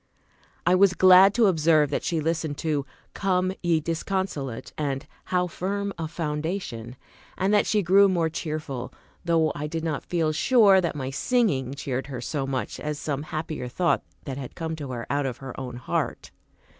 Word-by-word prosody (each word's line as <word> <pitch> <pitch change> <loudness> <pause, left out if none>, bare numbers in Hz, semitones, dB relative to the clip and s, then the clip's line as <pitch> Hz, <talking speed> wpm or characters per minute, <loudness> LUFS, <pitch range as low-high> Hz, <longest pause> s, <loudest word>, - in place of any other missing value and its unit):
I 175 - +4
was 185 0 +5
glad 185 +1 +8
to 235 -2 +5
observe 155 -5 +3
that - - -1
she 165 - 0
listened 160 -2 -1
to 150 -4 -1 0.3
"Come, 185 -1 +1
ye 170 -2 +2
disconsolate," 160 -6 -3
and 140 -3 -2 0.2
"How 180 -1 +1
firm 200 +3 -3
a 165 -2 -4
foundation;" 150 - -4 0.4
and 190 +2 +1
that 205 - +4
she 210 -2 +2
grew 195 +3 +6
more 170 -3 +1
cheerful; 150 -5 -4 0.3
though 165 -2 +2
I 150 +1 -4
did 165 +1 -4
not 155 -4 -1
feel 165 -3 0
sure 200 - +5
that 170 -4 -2
my 135 -2 -4
singing 140 - +1
cheered 135 -1 -3
her 130 -3 -5
so 135 +3 -3
much 130 -2 -3
as 150 -1 -3
some 145 -2 -3
happier 155 -3 -4
thought 170 +8 +1 0.2
that 135 -1 -5
had 130 - -8
come 160 -1 -3
to 145 -3 -6
her 120 -2 -4
out 140 -1 +1
of 125 -2 -4
her 130 0 -8
own 125 -2 -6
heart. 120 - -3
160 Hz, 180 wpm, -25 LUFS, 140-180 Hz, 0.4 s, glad